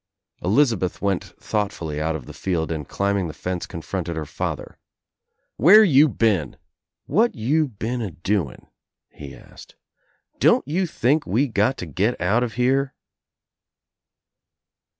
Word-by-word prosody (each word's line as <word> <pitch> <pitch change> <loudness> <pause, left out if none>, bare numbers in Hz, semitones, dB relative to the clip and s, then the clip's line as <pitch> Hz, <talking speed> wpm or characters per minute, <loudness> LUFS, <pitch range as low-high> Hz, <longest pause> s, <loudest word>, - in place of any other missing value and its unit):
Elizabeth 105 -3 +1
went 100 -2 0 0.2
thoughtfully 85 -8 -3
out 80 +1 -1
of 70 -6 -7
the - - -10
field 85 -4 -2
and 75 -3 -4
climbing 100 -2 0
the 80 - -8
fence 90 -1 -4
confronted 85 +1 -5
her 80 -1 -4
father. - - -5 0.8
"Where 200 - +8
you 155 -5 +6
been? 110 - 0 0.5
What 225 +10 +2
you 145 +8 +1
been 120 +1 -4
a 110 - -3
doing?" 85 -3 -3 0.5
he 70 -2 -10
asked. - - -15 0.6
"Don't - - +4
you 180 +5 0
think 145 +1 +1
we 130 +8 +2
got 110 +3 +1
to - - -5
get 95 - -1
out 100 +7 +2
of 120 -3 -2
here?" 135 +3 +1
105 Hz, 135 wpm, -23 LUFS, 85-130 Hz, 0.8 s, Where